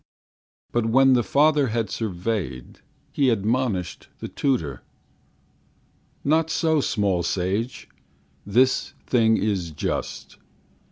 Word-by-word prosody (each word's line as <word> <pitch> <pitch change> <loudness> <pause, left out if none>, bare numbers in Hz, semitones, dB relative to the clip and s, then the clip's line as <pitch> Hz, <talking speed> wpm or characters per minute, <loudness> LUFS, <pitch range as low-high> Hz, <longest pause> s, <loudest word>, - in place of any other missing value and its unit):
But 120 -1 0
when 135 +3 +5
the 125 - +4
father 145 +1 +3
had 110 -3 -2
surveyed, 95 - -4 0.3
He 140 -2 +2
admonished 110 -3 -1
the - - -6
tutor: 80 - -1 1.4
"Not 160 +3 +2
so, 160 -1 +1
small 100 -8 0
sage! 95 +7 -2 0.6
This 125 +6 +2
thing 110 -3 +3
is 95 -5 -1
just. 75 - -4
115 Hz, 100 wpm, -24 LUFS, 95-130 Hz, 1.4 s, when